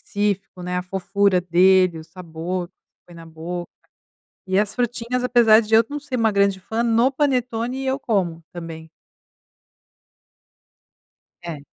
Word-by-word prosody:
específico 200 -3 -3
né, 180 0 -3
a - - -3
fofura 190 +1 +1
dele, 180 0 +4
o 160 - -9
sabor 175 +1 -5
que - - -45 0.3
põe 175 - -15
na 165 -1 -12
boca. 170 +2 -6 0.8
E 190 0 +1
as 210 0 0
frutinhas, 245 0 -2
apesar 235 -3 +5
de 220 0 -1
eu 225 - +6
não 295 0 -5
ser 275 -2 -4
uma 225 -2 +2
grande 200 -1 +2
fã, 225 +5 -2
no 235 +2 +3
panetone 255 -2 -1
eu 265 +1 0
como 180 -9 -1
também. 165 -2 -8 2.5
É. 170 -4 -6
195 Hz, 145 wpm, -22 LUFS, 175-230 Hz, 2.5 s, eu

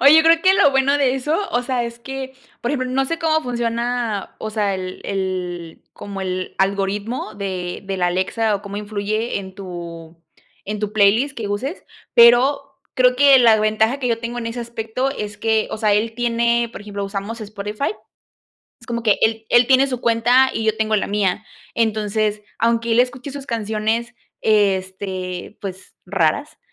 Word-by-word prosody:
Oye, 300 +4 +8
creo 330 0 +5
que 380 +1 +6
lo 285 - +5
bueno 275 +1 +2
de 265 -2 +2
eso, 295 +5 0
o 245 - 0
sea, 245 -2 -1
es 235 0 -7
que, 265 +1 -7 0.3
por 240 - -2
ejemplo, 255 -3 -1
no 270 +1 +1
sé 330 +4 -3
cómo 315 -1 +2
funciona, 235 -3 -2
o 215 - -5
sea, 210 -2 0
el 185 0 -6
el 180 -3 -4
como 200 -1 -7
el 185 -1 -3
algoritmo 200 +4 -1
de 185 -3 -4
de 195 0 -3
la 180 -1 +1
Alexa 205 +4 0
o 200 - -4
cómo 200 0 -7
influye 210 +2 -2
en 190 -1 -9
tu 170 -3 -8 0.5
en 210 +1 -4
tu 210 0 -2
playlist 220 +7 +3
que 215 -3 -4
uses, 255 - -4 0.3
pero 270 +4 +5 0.2
creo 250 -1 +4
que 280 0 +7
la 230 -3 +6
ventaja 220 +4 +2
que 250 -3 -1
yo 230 -1 +1
tengo 240 +1 -4
en 230 - -4
ese 230 +1 -4
aspecto 235 +2 -3
es 210 -6 -6
que, 220 0 +1
o - - -4
sea, 210 -1 +3
él 225 +2 0
tiene, 235 0 +1
por 205 - -9
ejemplo, 205 -1 -5
usamos 200 +3 -5
Spotify, 210 +3 -3 0.9
es - - -17
como 235 -1 -3
que 215 -3 +3
él 220 0 +1
él 240 0 +5
tiene 265 +1 +5
su 255 -3 -4
cuenta 240 +3 +4
y 225 - -2
yo 220 0 +1
tengo 220 -1 +1
la - - 0
mía. 205 0 0 0.3
Entonces, 215 -1 0 0.2
aunque 230 0 +1
él 235 - +5
escuche 250 +2 -2
sus 275 -1 -8
canciones, 225 +1 -1 0.3
este, 190 -2 -1
pues 190 -1 -8
raras, 190 - 0
220 Hz, 180 wpm, -20 LUFS, 200-245 Hz, 0.9 s, Oye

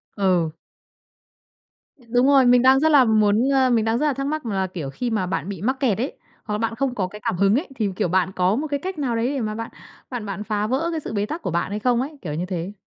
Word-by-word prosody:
Ừ. 180 -5 +2 1.6
Đúng 245 +2 +3
rồi, 275 -2 +6
mình 245 0 +6
đang 265 +1 +6
rất 315 +3 +3
là 280 -4 +6
muốn, 215 +2 +3
ờ, 265 -2 +3
mình 225 -2 +2
đang 225 +1 +1
rất 295 - 0
là 295 - +2
thắc 275 +1 -3
mắc 310 -1 -3
là, 195 -4 -1
kiểu, 170 -7 -6
khi 240 - -3
mà 215 -5 0
bạn 185 +1 -3
bị 190 -4 -6
mắc 260 +5 -1
kẹt 245 -8 +1
ấy, 255 +6 -3 0.3
hoặc 210 - -4
là - - 0
bạn 225 +1 -2
không 260 0 -1
có 190 -5 -1
cái 210 +3 -11
cảm 180 - -1
hứng 200 +3 +3
ấy 295 +8 -1
thì, 215 -4 0
kiểu, - - 0
bạn 185 +2 +1
có 185 +2 +2
một 305 +6 -2
cái 285 -1 -2
cách 370 +1 -5
nào 255 -5 -1
đấy 230 +1 0
để 275 - -2
mà 215 -1 -3
bạn 230 +1 -6 0.4
bạn 245 -4 -5
bạn 200 0 -5
phá 210 -1 -1
vỡ 265 +7 0
cái 325 - -2
sự 280 - -6
bế 205 0 0
tắc 315 +9 -5
của 180 - -3
bạn 170 +3 -1
hay 210 - -3
không 245 +2 +2
ấy? 290 +2 -6
Kiểu 150 -4 -5
như 170 +4 -2
thế. 180 +1 -4
225 Hz, 285 wpm, -22 LUFS, 195-265 Hz, 1.6 s, rồi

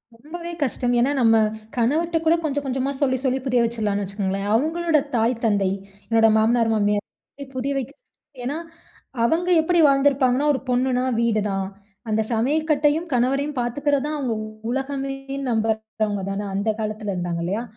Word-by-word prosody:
ரொம்பவே 335 +8 -8
கஷ்டம். 245 -2 -1
ஏன்னா, 260 +4 +3
நம்ம 225 -1 +5 0.4
கணவர்ட்ட 320 +8 +1
கூட 325 +1 +5
கொஞ்ச, 290 -2 -1
கொஞ்சமா 265 +1 -1
சொல்லி, 260 -2 +2
சொல்லி 260 0 +1
புரிய 250 -2 +2
வச்சுர்லான்னு 215 -3 -1
வச்சுக்கோங்களேன். 195 0 -3
அவுங்களோட 320 +5 +2 0.2
தாய், 230 +2 +2
தந்தை, 200 -3 +2 0.4
என்னோட 225 -1 +5
மாமனார், 225 +1 +3
மாமியார் 210 +6 -3
புரிய 265 +2 -1
வைக்க 270 -1 -3 0.5
ஏன்னா, 280 +5 -2 0.7
அவங்க 335 +9 +1
எப்பிடி 345 +2 +2
வாழ்ந்திருப்பாங்கன்னா, 275 -1 +3
ஒரு 265 - -1
பொண்ணுனா 250 0 +1 0.2
வீடு 225 -2 +2
தான். 195 -1 -2 0.4
அந்த 215 0 +2
சமையக்கட்டையும் 300 +5 +1
கணவரையும் 275 +4 +1
பார்த்துக்கிறதான் 285 +4 0
அவுங்க 260 -5 -1 0.4
உலகமேன்னு 270 +1 -3
நம்புறவங்க 220 -2 -1
தான 200 +1 -3
அந்த 200 +3 0
காலத்தில 215 -1 -3
இருந்தாங்க. 175 -2 -2
இல்லயா! 200 +6 -2
250 Hz, 140 wpm, -23 LUFS, 220-280 Hz, 0.7 s, நம்ம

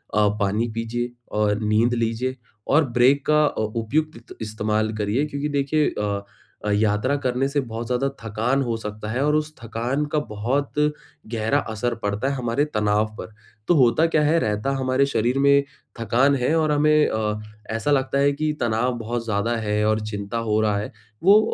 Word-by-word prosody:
अ, 105 0 +4
पानी 105 +3 +1
पीजिए 115 +2 -2
अ, 105 -4 -2
नींद 110 +3 +2
लीजिए, 115 +2 -1 0.3
और 155 +2 +4
ब्रेक 135 +3 +4
का 150 0 +4
अ, 145 - -1
उपयुक्त 115 +4 -2
इस्तेमाल 110 0 -1
करिए, 105 +7 0
क्योंकि 145 0 -3
देखिए 145 +1 +1
अ 100 -1 -1 0.4
अ, 105 - 0
यात्रा 105 +5 +2
करने 130 -1 0
से 145 +1 0
बहुत 115 +1 -4
ज़्यादा 125 +2 0 0.2
थकान 115 +5 0
हो 120 -2 -1
सकता 105 -1 -6
है 125 +4 -1
और 150 0 +2
उस 155 0 -1
थकान 120 +6 -2
का 155 - +3
बहुत 125 +7 -1 0.6
गहरा 110 +5 +1
असर 115 +3 -2
पड़ता 105 +5 -1
है - - -1
हमारे 125 +2 0
तनाव 105 -5 +1
पर। 110 - -8 0.3
तो 175 - +4
होता 135 +3 +4
क्या 160 -2 +2
है, 155 +3 +3
रहता 105 +1 -1
हमारे 130 +1 +2
शरीर 120 +1 0
में 140 0 +5 0.4
थकान 125 +5 +3
है 130 +3 +1
और 155 -1 +2
हमें 150 +1 +4
अ, 105 -1 -1 0.4
ऐसा 115 +6 -1
लगता 135 0 +1
है 140 +1 +4
कि 155 +2 -1
तनाव 120 +2 +1
बहुत 115 +1 -3
ज़्यादा 110 +2 0
है 105 -1 0
और 110 0 +2
चिंता 105 +1 -4
हो 105 0 +3
रहा 105 -2 +1
है। 105 - -4 0.3
वो 200 +4 +7
120 Hz, 180 wpm, -23 LUFS, 110-140 Hz, 0.6 s, वो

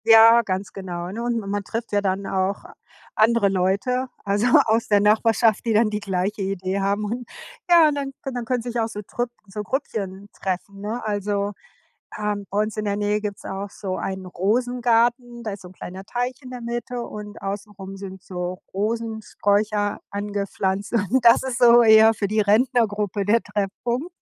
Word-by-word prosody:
Ja, 225 +1 +8
ganz 195 -2 -3
genau, 180 -2 -5
ne? 230 +4 -5
Und 240 -1 0
ma 210 - -8
man 200 +1 -2
trifft 230 +4 -5
ja 205 -1 +2
dann 195 0 -1
auch 190 +1 -1 0.5
andere 220 -2 +3
Leute, 195 +8 0 0.2
also, 205 +3 +1 0.2
aus 225 +1 +1
der 205 -1 +4
Nachbarschaft, 220 +1 +3
die 230 - +1
dann 215 0 +3
die 210 - -1
gleiche 195 +1 -2
Idee 190 0 -2
haben 200 +2 0
hun 240 +3 -4 0.4
ja 340 -2 +7
und 295 - -2
dann 280 -1 -3
dann 245 -3 -4
können 245 0 -1
sich 240 0 -3
auch 225 - +1
so 210 -2 -6
Trüpp 240 +4 -3 0.2
so 195 +2 -5
Grüppchen 200 -4 -4
treffen, 195 +1 -4
ne? 220 +4 -4
Also, 205 -1 -1 0.7
ähm, 210 -1 -2
bei 200 - -1
uns 215 0 -5
in 215 - -1
der 200 0 0
Nähe 210 0 0
gibt's 205 -2 -5
auch 195 +1 -4
so 190 -1 -5
einen 190 -1 -4
Rosengarten, 240 +4 +1
da 215 - -3
ist 200 - -7
so 180 - -10
'n - - -16
kleiner 185 +1 -8
Teich 245 +3 -2
in 255 - -10
der 250 - -6
Mitte 240 +1 -4
und 210 -2 -8
außen 200 +2 -4
rum 195 0 -9
sind 190 -1 -8
so 180 0 -5
Rosensträucher 210 -1 0
angepflanzt. 200 -1 -2
Und 235 +3 +1
das 235 0 +7
ist 255 -2 -3
so 240 -1 +7
eher 220 0 +7
für 205 -2 -2
die 215 +2 +1
Rentnergruppe 210 -2 +2
der 225 +3 +3
Treffpunkt, 235 - -3
ne? - - -62
210 Hz, 190 wpm, -23 LUFS, 195-235 Hz, 0.7 s, Ja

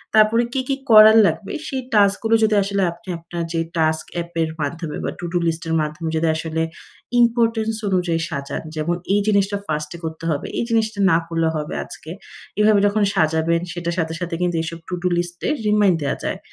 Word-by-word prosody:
তারপরে 215 +2 +5
কি, 265 - 0
কি 275 - +1 0.2
করার 215 0 +9
লাগবে, 200 - -1 0.2
সেই 265 -1 -3
টাস্কগুলো 210 +2 +3
যদি 215 -1 +3
আসলে 200 0 -1
আপনি 170 +2 -14
আপনার 170 0 -5
যে 165 - 0 0.2
টাস্ক 160 -1 +1
এ্যাপের 170 -1 -2
মাধ্যমে 160 +1 -4
বা - - -1
to-do 175 0 -2
list 165 0 -2
এর 165 - -1
মাধ্যমে 155 +2 -3
যদি 160 +1 +1
আসলে 160 0 -3 0.6
ইম্পোর্টেন্স 230 -2 +2
অনুযায়ী 175 -3 0
সাজান। 140 0 -4
যেমন 155 +3 -1 0.2
এই 205 - +4
জিনিসটা 200 -1 +2
ফার্স্টে 150 +1 -3
করতে 160 0 -6
হবে, 145 - -2
এই - - +1
জিনিসটা 220 -2 0
না 165 - +5
করলে 165 -1 0
হবে 150 -1 -4
আজকে। 160 - -10 0.5
এভাবে 210 -1 +5
যখন 205 +1 +1
সাজাবেন, 160 +1 +2
সেটার 170 -1 -3
সাথে 160 -1 -1
সাথে 175 -1 -3
কিন্তু 175 -1 0
এসব 165 0 -6
to-do 180 0 -1
list 175 0 -3
এ - - +1 0.2
রিমাইন্ড 210 -3 +4
দেয়া 140 - -1
যায়। - - -2
175 Hz, 185 wpm, -21 LUFS, 160-210 Hz, 0.6 s, করার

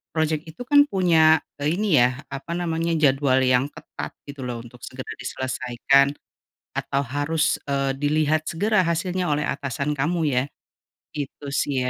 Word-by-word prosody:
project 160 0 0
itu 165 +10 -8
kan 285 +3 +5
punya, 160 - +4 0.2
eee, 150 +4 +1
ini 195 -9 +3
ya, 125 +3 +2
apa 140 +5 -5
namanya, 165 -1 -1
jadwal 140 -3 +3
yang 130 +1 +3
ketat, - - -9
gitu 140 -3 -7
loh, 120 -1 -5
untuk 120 +1 -14
segera 130 +2 -8
diselesaikan, 130 +2 +1 0.6
atau 140 - -1
harus, 145 +4 +1 0.2
eee, 135 -1 0
dilihat 155 +2 +1
segera 205 +3 +2
hasilnya 175 0 -1
oleh 145 0 0
atasan 140 +2 -2
kamu 160 +3 0
ya. 125 -2 +2 0.7
Itu 145 -1 -6
sih 135 -2 0
145 Hz, 145 wpm, -23 LUFS, 135-165 Hz, 0.7 s, kan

